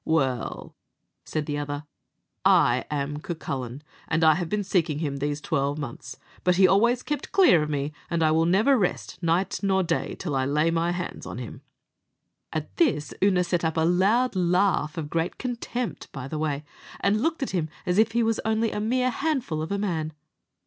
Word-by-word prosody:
"Well," 135 Hz, -7 st, -1 dB, 0.5 s
said 155 Hz, -1 st, -2 dB
the 145 Hz, -1 st, -2 dB
other, 145 Hz, +1 st, -4 dB, 0.6 s
"I 120 Hz, +1 st, +4 dB
am 145 Hz, 0 st, -2 dB
Cucullin, 140 Hz, -5 st, -5 dB, 0.2 s
and 165 Hz, 0 st, +1 dB
I 160 Hz, -1 st, +7 dB
have 170 Hz, +1 st, -3 dB
been 210 Hz, -1 st, 0 dB
seeking 170 Hz, -6 st, +1 dB
him 145 Hz, -3 st, -2 dB
these 145 Hz, +1 st, -2 dB
twelve 145 Hz, -1 st, -1 dB
months, 130 Hz, -2 st, -7 dB, 0.3 s
but 180 Hz, -1 st, +3 dB
he 190 Hz, +1 st, +6 dB
always 235 Hz, +6 st, +3 dB
kept 295 Hz, -1 st, -4 dB
clear 360 Hz, -, +6 dB
of 150 Hz, -, -2 dB
me; 145 Hz, 0 st, -2 dB, 0.2 s
and 170 Hz, -1 st, +1 dB
I 155 Hz, -, +4 dB
will 160 Hz, +1 st, +3 dB
never 220 Hz, +9 st, +4 dB
rest 180 Hz, -2 st, -2 dB
night 170 Hz, +3 st, +1 dB
or 190 Hz, -1 st, +2 dB
day 170 Hz, -, -1 dB
till 155 Hz, -7 st, -3 dB
I 130 Hz, -1 st, +1 dB
lay 150 Hz, +4 st, +2 dB
my 165 Hz, +1 st, +1 dB
hands 175 Hz, 0 st, -5 dB
on -, -, -6 dB
him." -, -, -7 dB, 0.9 s
At -, -, -5 dB
this 230 Hz, -, +1 dB
Oonagh 185 Hz, -2 st, +3 dB
set 170 Hz, -1 st, 0 dB
up 160 Hz, 0 st, 0 dB
a -, -, +3 dB
loud 200 Hz, +8 st, +3 dB
laugh, 180 Hz, -3 st, +2 dB
of 155 Hz, -2 st, -3 dB
great 165 Hz, +3 st, -2 dB
contempt, 245 Hz, -1 st, -4 dB
by 135 Hz, -2 st, -6 dB
the 155 Hz, +2 st, -4 dB
way, 150 Hz, -2 st, -1 dB, 0.4 s
and 210 Hz, +2 st, +2 dB
looked 320 Hz, 0 st, 0 dB
at -, -, -3 dB
him 165 Hz, -4 st, -1 dB, 0.2 s
as 180 Hz, +3 st, +2 dB
if 225 Hz, 0 st, +3 dB
he 235 Hz, 0 st, +2 dB
was 225 Hz, 0 st, +1 dB
only 220 Hz, 0 st, +1 dB
a -, -, -3 dB
mere 255 Hz, +3 st, +1 dB
handful 250 Hz, -, -1 dB
of 160 Hz, -, -4 dB
a 200 Hz, -, 0 dB
man. 165 Hz, -6 st, -2 dB
170 Hz, 195 wpm, -26 LUFS, 150-205 Hz, 0.9 s, I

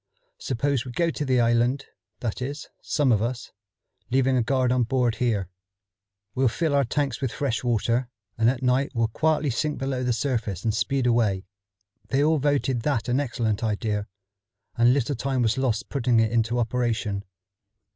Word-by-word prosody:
Suppose 135 Hz, 0 st, -1 dB
we 125 Hz, -, -7 dB
go 165 Hz, +6 st, +1 dB
to 150 Hz, -, -3 dB
the 130 Hz, -3 st, +2 dB
island, 120 Hz, +3 st, +2 dB, 0.4 s
that 115 Hz, 0 st, -3 dB
is, 140 Hz, +4 st, -5 dB
some 145 Hz, -4 st, +1 dB
of 105 Hz, -3 st, +3 dB
us, 120 Hz, +2 st, -3 dB, 0.6 s
leaving 130 Hz, +1 st, +2 dB
a 125 Hz, -, +3 dB
guard 130 Hz, +1 st, +1 dB
on 125 Hz, 0 st, +2 dB
board 120 Hz, -1 st, +1 dB
here. 110 Hz, -7 st, 0 dB, 0.9 s
We'll 130 Hz, 0 st, +2 dB
fill 155 Hz, +6 st, 0 dB
our 140 Hz, -1 st, +4 dB
tanks 135 Hz, 0 st, -1 dB
with 130 Hz, -3 st, -1 dB
fresh 135 Hz, -5 st, -2 dB
water, 120 Hz, +1 st, 0 dB, 0.3 s
and 115 Hz, +1 st, +3 dB
at 130 Hz, 0 st, -2 dB
night 130 Hz, +3 st, +1 dB
we'll 115 Hz, -1 st, +1 dB
quietly 155 Hz, +3 st, +1 dB
sink 150 Hz, +5 st, -1 dB
below 135 Hz, -1 st, -2 dB
the 125 Hz, -, +1 dB
surface 115 Hz, -6 st, -2 dB
and 110 Hz, -, +1 dB
speed 135 Hz, +3 st, 0 dB
away." 110 Hz, -6 st, +2 dB, 0.6 s
They 140 Hz, +1 st, +2 dB
all 155 Hz, 0 st, +3 dB
voted 135 Hz, -3 st, +1 dB
that 120 Hz, -3 st, -1 dB
an 125 Hz, +3 st, +2 dB
excellent 115 Hz, -6 st, -1 dB
idea, 105 Hz, -1 st, -1 dB, 0.7 s
and 120 Hz, 0 st, +5 dB
little 140 Hz, +1 st, +1 dB
time 130 Hz, 0 st, -1 dB
was 115 Hz, +3 st, +1 dB
lost 130 Hz, -4 st, 0 dB
putting 125 Hz, -4 st, +2 dB
it 110 Hz, -1 st, +2 dB
into 115 Hz, +1 st, +1 dB
operation. 115 Hz, -4 st, -1 dB
125 Hz, 175 wpm, -25 LUFS, 115-135 Hz, 0.9 s, and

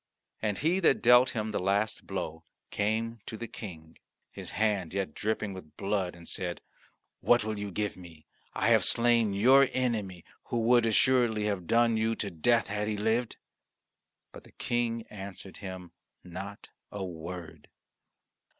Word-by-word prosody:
And 105 Hz, -2 st, -1 dB
he 170 Hz, +5 st, +1 dB
that 165 Hz, -7 st, +3 dB
dealt 125 Hz, +1 st, +6 dB
him 110 Hz, -1 st, -2 dB
the -, -, -1 dB
last 100 Hz, +3 st, 0 dB
blow 80 Hz, +1 st, -4 dB, 0.3 s
came 115 Hz, +3 st, -1 dB
to 110 Hz, -, -6 dB
the 115 Hz, -, -6 dB
King, 80 Hz, -8 st, -10 dB, 0.3 s
his -, -, -8 dB
hand 100 Hz, -5 st, 0 dB
yet 100 Hz, -1 st, -2 dB
dripping 105 Hz, -1 st, -2 dB
with 90 Hz, -5 st, -12 dB
blood, 100 Hz, -3 st, -1 dB
and 85 Hz, -1 st, -13 dB
said, 90 Hz, -2 st, -3 dB, 0.6 s
"What 120 Hz, -2 st, +4 dB
will 110 Hz, -1 st, -3 dB
you 100 Hz, 0 st, -4 dB
give 105 Hz, +1 st, -2 dB
me? 85 Hz, -4 st, -14 dB, 0.3 s
I -, -, +2 dB
have -, -, +5 dB
slain 115 Hz, -2 st, +4 dB
your 130 Hz, +6 st, +6 dB
enemy, 105 Hz, -9 st, -2 dB, 0.2 s
who 120 Hz, -, -2 dB
would 120 Hz, 0 st, +4 dB
assuredly 115 Hz, -1 st, +3 dB
have 100 Hz, -5 st, -2 dB
done 115 Hz, -1 st, +3 dB
you 110 Hz, +1 st, +1 dB
to 100 Hz, -3 st, -3 dB
death 115 Hz, +8 st, +2 dB
had 105 Hz, 0 st, -2 dB
he 105 Hz, -1 st, -1 dB
lived." 110 Hz, +3 st, 0 dB, 0.9 s
But -, -, -12 dB
the -, -, -19 dB
King 115 Hz, -1 st, -1 dB
answered 100 Hz, -1 st, -9 dB
him 95 Hz, -3 st, -8 dB, 0.3 s
not 95 Hz, +3 st, -8 dB, 0.2 s
a 100 Hz, -2 st, -4 dB
word. 85 Hz, 0 st, -8 dB
105 Hz, 160 wpm, -29 LUFS, 95-115 Hz, 0.9 s, dealt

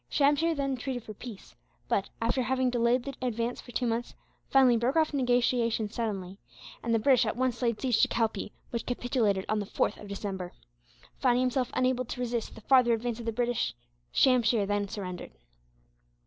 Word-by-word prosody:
Shamsheer 295 Hz, +3 st, +3 dB
then 275 Hz, -2 st, -1 dB
treated 250 Hz, -1 st, -4 dB
for 215 Hz, -, -8 dB
peace 215 Hz, -1 st, -10 dB, 0.3 s
but, 195 Hz, -, 0 dB
after 235 Hz, +3 st, +1 dB
having 255 Hz, +1 st, +1 dB
delayed 240 Hz, +1 st, +2 dB
the 275 Hz, -, -5 dB
advance 235 Hz, -1 st, -2 dB
for 245 Hz, -, -12 dB
two 250 Hz, -, -1 dB
months, 235 Hz, +1 st, -2 dB, 0.3 s
finally 260 Hz, -3 st, +6 dB
broke 240 Hz, +5 st, +1 dB
off 315 Hz, -2 st, +2 dB
negotiations, 245 Hz, -4 st, +1 dB
suddenly; 195 Hz, -4 st, -3 dB, 0.4 s
and 235 Hz, -, -2 dB
the 230 Hz, -, +4 dB
British 255 Hz, 0 st, +4 dB
at -, -, -1 dB
once 255 Hz, -2 st, 0 dB
laid 235 Hz, -3 st, 0 dB
siege 250 Hz, -4 st, +2 dB
to -, -, +5 dB
Calpee, 220 Hz, -3 st, -1 dB, 0.2 s
which 235 Hz, -, -3 dB
capitulated 240 Hz, -6 st, 0 dB
on 215 Hz, -, 0 dB
the 205 Hz, -, -4 dB
4th 205 Hz, -, -1 dB
of 210 Hz, -, -9 dB
December. 195 Hz, -3 st, -5 dB, 0.7 s
Finding 250 Hz, -2 st, +3 dB
himself 255 Hz, 0 st, 0 dB
unable 255 Hz, 0 st, +2 dB
to 245 Hz, -, -6 dB
resist 240 Hz, -2 st, -2 dB
the -, -, -11 dB
farther 250 Hz, 0 st, +5 dB
advance 230 Hz, 0 st, -2 dB
of 230 Hz, -, -7 dB
the -, -, +1 dB
British, 240 Hz, -, -1 dB, 0.4 s
Shamsheer 240 Hz, -5 st, +4 dB
then 205 Hz, 0 st, 0 dB
surrendered. 185 Hz, -3 st, -6 dB
240 Hz, 180 wpm, -29 LUFS, 220-255 Hz, 0.7 s, finally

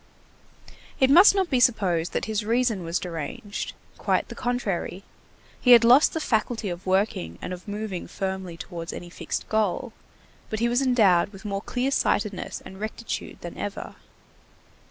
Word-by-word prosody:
It 265 Hz, -1 st, +4 dB
must 370 Hz, +6 st, +8 dB
not 380 Hz, -4 st, 0 dB
be 255 Hz, -, +3 dB
supposed 185 Hz, -9 st, +2 dB
that -, -, -1 dB
his 215 Hz, -1 st, -1 dB
reason 230 Hz, -3 st, +1 dB
was 165 Hz, +1 st, -1 dB
deranged. 175 Hz, +4 st, -5 dB, 0.3 s
Quite -, -, 0 dB
the -, -, -6 dB
contrary. 200 Hz, -7 st, -2 dB, 0.6 s
He 250 Hz, -, +7 dB
had 235 Hz, -1 st, +8 dB
lost 250 Hz, +6 st, +6 dB
the -, -, 0 dB
faculty 225 Hz, -5 st, -1 dB
of 175 Hz, +2 st, -7 dB
working 185 Hz, -, 0 dB
and 180 Hz, -, -5 dB
of 180 Hz, +2 st, -10 dB
moving 205 Hz, -3 st, -4 dB
firmly 190 Hz, -3 st, -4 dB
towards 170 Hz, -1 st, -7 dB
any 175 Hz, -1 st, -8 dB
fixed -, -, -4 dB
goal, 215 Hz, -5 st, 0 dB, 0.6 s
but 215 Hz, -, -2 dB
he 235 Hz, -, +2 dB
was 240 Hz, +2 st, +2 dB
endowed 215 Hz, -10 st, +4 dB
with 195 Hz, +1 st, -13 dB
more 200 Hz, -1 st, -2 dB
clear 255 Hz, +5 st, -1 dB
sightedness 210 Hz, -7 st, -1 dB
and 190 Hz, -, -10 dB
rectitude 220 Hz, +2 st, -5 dB
than 175 Hz, -, -7 dB
ever. 205 Hz, -1 st, -5 dB
210 Hz, 160 wpm, -25 LUFS, 180-240 Hz, 0.6 s, must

